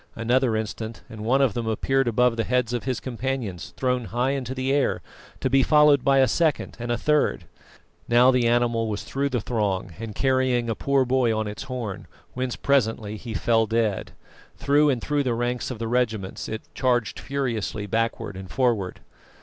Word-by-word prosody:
Another 120 +1 +1
instant, 110 +1 -5
and 110 -1 -7
one 130 +5 +3
of 125 -7 +2
them 115 0 -3
appeared 135 +4 +1
above 125 +1 +3
the 115 - 0
heads 125 -1 0
of 120 - -3
his 130 -2 -1
companions, 125 -7 -4
thrown 125 -2 0
high 125 +4 0
into 130 -2 -3
the 130 +1 0
air, 140 -1 +1 0.4
to - - +1
be 135 +1 +4
followed 150 -1 +5
by 135 +1 +4
a 135 -1 +5
second 160 -1 0
and 120 0 -3
a 120 - +1
third. 150 +5 +1 0.7
Now 120 +2 +6
the 125 -2 +2
animal 120 -1 +2
was 105 -1 -3
through 140 +1 -2
the 125 -3 0
throng 100 -6 -1
and 110 -2 -6
carrying 130 -3 +1
a - - -2
poor 140 +2 +1
boy 125 -3 +2
on 110 - -1
its 105 - -6
horn, 110 -6 -5 0.3
whence 125 -1 -2
presently 115 -6 0
he 110 +1 -7
fell 115 +1 +2
dead; 110 -3 -1 0.4
through 145 +1 +3
and 130 -4 +1
through 145 -1 0
the 125 -4 0
ranks 120 +1 -2
of 125 - -5
the 115 +1 -4
regiments 110 -5 -1
it 110 0 -5
charged 120 -4 0
furiously 120 -7 -3
backward 110 -1 -2
and 95 0 -8
forward. 115 -7 0
120 Hz, 190 wpm, -24 LUFS, 110-130 Hz, 0.7 s, Now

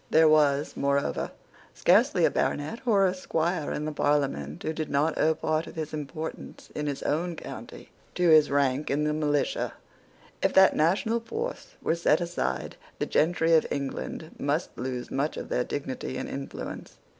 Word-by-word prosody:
There 160 0 +6
was, 150 -2 +3
moreover, 140 0 0 0.5
scarcely - - +4
a - - +3
baronet 150 +11 -1
or 200 -4 +5
a 185 - +2
squire 170 -3 -1
in 150 - -3
the 155 - -2
Parliament 140 - 0
who 160 - -1
did 155 -1 -4
not 150 +3 +1
owe 160 0 +3
part 155 +1 -1
of - - -10
his 155 -1 -4
importance 155 +2 -6
in 150 0 -3
his 140 -2 -3
own 170 +3 -1
county - - -9 0.2
to 180 -1 +2
his 155 -2 +7
rank 140 0 +1
in 145 +2 +1
the 150 0 +1
militia. 150 -2 0 0.7
If - - +2
that 190 0 +7
national 195 +9 +2
force 455 - -5
were - - +2
set 170 -2 +3
aside, 175 0 -3 0.2
the - - -1
gentry 165 0 +2
of 160 - +5
England 135 - -4
must - - -1
lose 125 0 -4
much 140 +3 -1
of - - -6
their 125 - +1
dignity 130 -1 -4
and - - -4
influence. 135 0 -7
155 Hz, 170 wpm, -27 LUFS, 140-165 Hz, 0.7 s, his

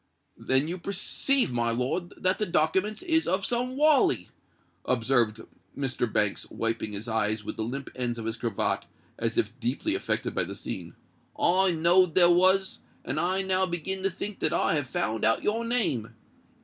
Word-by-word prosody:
"Then 130 +3 +2
you 180 +2 -4
perceive, 200 - 0
my 120 -1 +1
lord, 125 +9 -2
that 185 +1 0
the 210 - 0
dokiments 185 +6 +1
is 325 -2 +1
of 190 +1 0
some 250 +2 -1
wally," 300 -1 +3 0.5
observed 120 -3 +1 0.4
Mr. 130 -4 -1
Banks, 105 -2 0
wiping 115 -2 -2
his 105 +3 -5
eyes 110 -1 0
with - - -5
the 110 - -3
limp 135 +4 -5
ends 120 -2 -2
of 115 - -6
his 115 0 -2
cravat, 115 -3 -1 0.3
as 115 0 -2
if 105 - +1
deeply 130 - -1
affected 380 - -1
by - - +1
the - - -7
scene. - - -6 0.4
"I 190 +2 +3
knowed 170 +1 +4
they 180 - +7
was; 185 +2 +4 0.3
and 135 +5 -2
I 185 +3 0
now 190 0 +1
begin 180 +2 -3
to 195 - +1
think 195 +2 -6
that 155 - 0
I - - +2
have 145 -5 -1
found 115 -11 -2
out 115 0 +2
your 225 +2 0
name. 195 - -1
160 Hz, 175 wpm, -27 LUFS, 115-190 Hz, 0.5 s, they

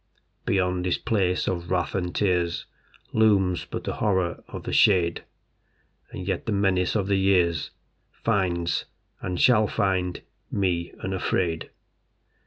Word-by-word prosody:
Beyond 90 -2 +1
this 90 -1 +1
place 95 -6 0
of 85 -2 -2
wrath 90 -2 0
and 90 -2 -2
tears 90 -4 +1 0.5
Looms 100 -5 +3
but - - -5
the - - -4
Horror 95 -4 0
of - - -8
the - - -4
shade, 85 -4 +4 0.9
And 90 0 -7
yet 95 -3 -2
the - - 0
menace 95 -2 +1
of 100 -3 +1
the 100 0 +1
years 90 -5 +2 0.4
Finds, 90 -6 0 0.4
and 90 -1 -3
shall 110 -4 +5
find, 90 -3 -1 0.3
me 90 -4 -1
unafraid. 90 -3 -1
90 Hz, 130 wpm, -25 LUFS, 90-100 Hz, 0.9 s, shall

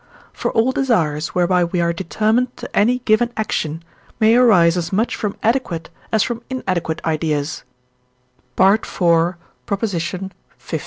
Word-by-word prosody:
For - - -2
all 230 +3 +3
desires, 170 - 0
whereby 180 0 +3
we 175 +1 -1
are 170 0 +1
determined 220 +8 0
to - - -9
any 240 +5 +3
given 235 +2 +3
action, 165 -7 -2 0.4
may 220 +1 +5
arise 185 -9 +5
as 170 -1 -3
much 215 +5 0
from 210 -3 -3
adequate 220 -8 -1 0.2
as 220 -2 +3
from 240 -2 -4
inadequate 185 -10 -3
ideas 155 -2 -1 1.0
(IV. 195 +4 +5 0.2
lix.). 175 +2 -1
190 Hz, 125 wpm, -19 LUFS, 170-225 Hz, 1.0 s, may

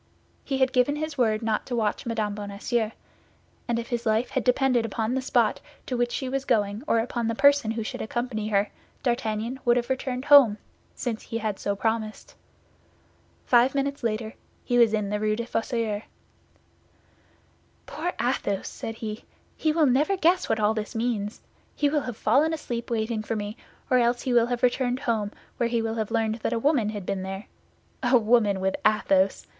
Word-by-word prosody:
He 270 - -2
had 260 0 +2
given 255 +3 +3
his 310 0 -4
word 225 -4 +1
not 220 -1 -1
to 245 - -2
watch 220 0 -1
Mme. 215 -3 -1
Bonacieux, 210 +3 -2 0.8
and 235 -1 0
if 235 +1 -4
his 240 -2 -2
life 220 +2 +1
had - - 0
depended 250 -1 +3
upon 225 +1 -2
the 265 - 0
spot 260 - +1 0.2
to 255 - -3
which 240 0 0
she 265 - -3
was 270 +1 -2
going 205 -3 +1
or - - +3
upon 230 0 -1
the 230 - -1
person 285 -2 +4
who 225 0 -2
should - - -5
accompany 225 -1 -3
her, 205 -1 +1 0.3
D'Artagnan 235 0 -1
would 240 -1 +4
have 240 +1 -1
returned 260 0 -2
home, 270 -8 +7 0.4
since 235 -4 -3
he 230 - -5
had 215 -3 -3
so 200 - -1
promised. 220 0 -2 1.1
Five 250 +2 +4
minutes 280 0 -1
later 220 -1 -2 0.3
he 245 0 +1
was 230 -2 +6
in 210 -2 -1
the 210 - 0
Rue 215 0 +1
des 235 +1 -3
Fossoyeurs. 225 -3 -2 1.8
"Poor 345 +4 -3
Athos!" 235 -5 -1
said 225 - -6
he; 215 -1 -6 0.3
"he 310 - +1
will 315 0 +3
never 290 +9 +2
guess 360 +1 +2
what 220 - +1
all 210 +1 +3
this 215 +2 -5
means. 225 -3 -2 0.3
He 290 - +2
will 295 0 +1
have 245 -4 -6
fallen 290 +8 +3
asleep 240 -7 -4
waiting 225 -1 -1
for 220 +1 -3
me, 205 0 -4 0.3
or 255 - +4
else 240 0 +1
he 255 - 0
will 235 -1 +4
have 245 0 -3
returned 250 +1 +1
home, 220 -6 -1 0.3
where 235 -1 +1
he 235 0 +1
will 225 0 -1
have 220 -2 -2
learned 225 -1 0
that 230 - -2
a - - 0
woman 245 -3 +2
had 205 -3 -5
been 195 0 -2
there. 195 +2 -5 0.6
A 250 0 +5
woman 215 -3 +3
with 190 0 0
Athos! 195 -2 +2
230 Hz, 190 wpm, -26 LUFS, 215-250 Hz, 1.8 s, home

